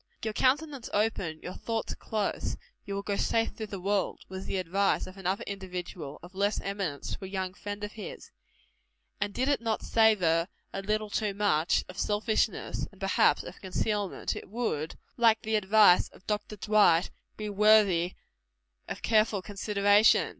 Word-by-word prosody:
"Your 220 Hz, -1 st, -2 dB
countenance 275 Hz, +1 st, +1 dB
open, 200 Hz, -7 st, 0 dB
your 180 Hz, -, -5 dB
thoughts 225 Hz, -1 st, -3 dB
close, 215 Hz, -2 st, -2 dB, 0.3 s
you 200 Hz, -, -4 dB
will 200 Hz, -, -3 dB
go 200 Hz, 0 st, -1 dB
safe 225 Hz, 0 st, +1 dB
through 220 Hz, -, -6 dB
the 200 Hz, -2 st, -6 dB
world" 200 Hz, +1 st, -1 dB
was 190 Hz, 0 st, -6 dB
the -, -, -1 dB
advice 185 Hz, +2 st, +1 dB
of 185 Hz, -, -11 dB
another 190 Hz, 0 st, -2 dB
individual, 180 Hz, -6 st, -6 dB
of 175 Hz, +2 st, -12 dB
less 200 Hz, +2 st, 0 dB
eminence, 195 Hz, -8 st, -3 dB
to -, -, -11 dB
a -, -, -6 dB
young 190 Hz, -1 st, -3 dB
friend 205 Hz, +1 st, -6 dB
of 210 Hz, -, -4 dB
his; 215 Hz, -, -9 dB, 0.9 s
and 205 Hz, 0 st, -1 dB
did 255 Hz, +5 st, -1 dB
it 285 Hz, -4 st, +2 dB
not 225 Hz, -2 st, -1 dB
savor 180 Hz, -7 st, +3 dB, 0.3 s
a 195 Hz, -, -3 dB
little 215 Hz, +1 st, -1 dB
too 205 Hz, -2 st, -1 dB
much 180 Hz, -6 st, +2 dB
of 185 Hz, +1 st, -9 dB
selfishness, 215 Hz, +1 st, 0 dB
and -, -, -20 dB
perhaps -, -, +3 dB
of -, -, -10 dB
concealment, 205 Hz, +1 st, -2 dB
it -, -, -8 dB
would, 200 Hz, -9 st, -2 dB, 0.2 s
like 225 Hz, -2 st, +4 dB
the 220 Hz, -, -2 dB
advice 210 Hz, -2 st, +5 dB
of -, -, -20 dB
Dr. 210 Hz, 0 st, -2 dB
Dwight, 205 Hz, -5 st, +4 dB, 0.3 s
be 215 Hz, -, -4 dB
worthy 205 Hz, -4 st, +4 dB, 0.7 s
of -, -, -6 dB
careful 215 Hz, -3 st, +2 dB
consideration. 205 Hz, +1 st, +3 dB
205 Hz, 165 wpm, -29 LUFS, 190-215 Hz, 0.9 s, advice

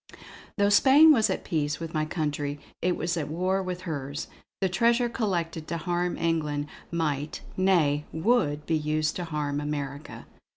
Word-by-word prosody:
Though 200 Hz, 0 st, +3 dB
Spain 275 Hz, +9 st, +7 dB
was 225 Hz, -6 st, +3 dB
at -, -, -2 dB
peace 150 Hz, -4 st, -1 dB
with 165 Hz, -1 st, -6 dB
my 155 Hz, -1 st, 0 dB
country, 150 Hz, -2 st, -2 dB, 0.2 s
it 180 Hz, 0 st, +1 dB
was 170 Hz, +1 st, -1 dB
at 155 Hz, -, -2 dB
war 185 Hz, +5 st, 0 dB
with 180 Hz, -1 st, -4 dB
hers; 145 Hz, -4 st, -5 dB, 0.3 s
the 195 Hz, -, +2 dB
treasure 235 Hz, +6 st, +2 dB
collected 170 Hz, -9 st, -2 dB
to 170 Hz, -, -2 dB
harm 175 Hz, +2 st, -1 dB
England 150 Hz, -3 st, 0 dB, 0.2 s
might 150 Hz, -3 st, -2 dB
nay, 160 Hz, -6 st, +2 dB
would 160 Hz, -5 st, +1 dB
be 165 Hz, -, +1 dB
used 155 Hz, 0 st, 0 dB
to 175 Hz, -, -3 dB
harm 150 Hz, -2 st, -2 dB
America. 145 Hz, -1 st, -5 dB
165 Hz, 160 wpm, -27 LUFS, 150-185 Hz, 0.3 s, Spain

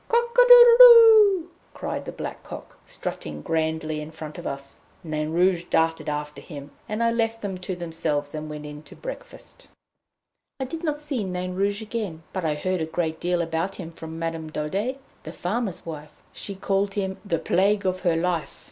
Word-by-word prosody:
"Cock 475 Hz, 0 st, +1 dB
a -, -, +7 dB
doodle 485 Hz, -1 st, +9 dB
doo!" 440 Hz, -7 st, +8 dB, 0.3 s
cried -, -, -4 dB
the -, -, -5 dB
black -, -, -7 dB
cock, -, -, -11 dB
strutting -, -, -6 dB
grandly 160 Hz, -2 st, -1 dB
in 150 Hz, -, -8 dB
front 155 Hz, -1 st, -9 dB
of -, -, -6 dB
us. 140 Hz, 0 st, -7 dB, 0.2 s
Nain 155 Hz, -2 st, -3 dB
Rouge 175 Hz, +1 st, +2 dB
darted 165 Hz, -1 st, 0 dB
after 150 Hz, 0 st, -5 dB
him, 145 Hz, -2 st, -10 dB, 0.2 s
and 215 Hz, +2 st, -1 dB
I 230 Hz, -, +3 dB
left 230 Hz, -1 st, -1 dB
them 190 Hz, -2 st, -4 dB
to 185 Hz, 0 st, -4 dB
themselves 160 Hz, -4 st, -2 dB
and 155 Hz, 0 st, -6 dB
went 150 Hz, 0 st, -7 dB
in 150 Hz, 0 st, -9 dB
to -, -, -15 dB
breakfast. -, -, -10 dB, 0.9 s
I 265 Hz, -, -2 dB
did 320 Hz, +6 st, -7 dB
not 300 Hz, -3 st, -1 dB
see 290 Hz, -6 st, -3 dB
Nain 180 Hz, -1 st, -4 dB
Rouge 200 Hz, +3 st, -1 dB
again, 210 Hz, -8 st, -5 dB
but 185 Hz, -, -3 dB
I 155 Hz, -2 st, 0 dB
heard 185 Hz, +3 st, -2 dB
a 160 Hz, -, -2 dB
great 160 Hz, -1 st, -2 dB
deal 175 Hz, -1 st, 0 dB
about 165 Hz, +3 st, -2 dB
him 170 Hz, -3 st, -8 dB
from 160 Hz, 0 st, -9 dB
Madame 165 Hz, -1 st, -4 dB
Daudet, 195 Hz, -, -2 dB, 0.2 s
the 160 Hz, -, -8 dB
farmer's 200 Hz, +1 st, -3 dB
wife; 155 Hz, -2 st, -8 dB, 0.2 s
she 200 Hz, -, -6 dB
called 195 Hz, +1 st, -1 dB
him 190 Hz, -2 st, -3 dB
"the 175 Hz, -5 st, -1 dB
plague 195 Hz, +5 st, +1 dB
of 185 Hz, 0 st, 0 dB
her 175 Hz, -3 st, +1 dB
life." 170 Hz, -1 st, -2 dB
180 Hz, 190 wpm, -24 LUFS, 160-215 Hz, 0.9 s, doodle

